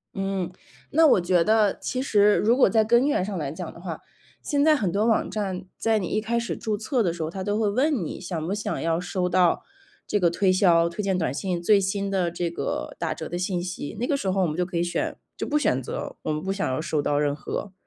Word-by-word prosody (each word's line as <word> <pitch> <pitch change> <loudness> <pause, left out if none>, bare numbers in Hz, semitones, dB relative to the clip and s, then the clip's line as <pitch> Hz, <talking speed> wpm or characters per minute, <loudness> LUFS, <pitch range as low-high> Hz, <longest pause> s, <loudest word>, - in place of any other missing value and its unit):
嗯， 195 -2 -2 0.4
那 320 +1 +6
我 205 - +5
觉 175 -1 +3
得， 215 -1 +3
其 255 - -3
实， 210 -5 +4
如 230 +3 +3
果 260 - +5
在 220 +2 +3
根 235 +5 +3
源 235 -10 +1
上 200 -1 -4
来 145 -3 -3
讲 165 +1 -7
的 170 - -13
话， 175 -3 -5 0.4
现 285 -1 +1
在 310 0 +6
很 200 - 0
多 210 +4 +1
网 225 - +2
站 190 -3 -3
在 225 -1 +2
你 195 - -2
一 215 - 0
开 235 +2 0
始 235 - -3
注 215 -2 -2
册 240 +3 0
的 180 - +1
时 165 -1 -4
候， 155 - -2
它 190 0 -5
都 205 +1 -1
会 215 - +2
问 255 - +1
你： - - -6
“想 170 -3 -4
不 190 - -2
想 210 - -3
要 165 0 0
收 180 0 -2
到 180 -1 +2 0.4
这 205 - 0
个 175 -3 +4
推 185 +2 +2
销、 170 -3 +4
推 170 +5 -4
荐 190 -2 +1
短 160 - -1
信、 180 +3 -2
最 200 +3 +5
新 195 +1 -1
的， 185 -3 +1
这 170 0 -3
个， - - -4
打 - - -1
折 - - -6
的 175 - -4
信 180 -1 -1
息？” 180 -3 -5
那 245 - 0
个 285 - +1
时 195 -8 -2
候 190 0 +1
我 - - +2
们 155 - -3
就 180 - +1
可 175 -1 -4
以 170 - +2
选 175 - -2 0.2
就 - - -4
不 300 - +1
选 130 - +1
择， - - -5
我 - - -2
们 155 +2 -3
不 195 - -1
想 195 0 -1
要 130 +3 -1
收 155 -2 -1
到 145 0 0
任 145 -1 +1
何。 190 +5 -5
190 Hz, 285 characters per minute, -25 LUFS, 170-215 Hz, 0.4 s, 那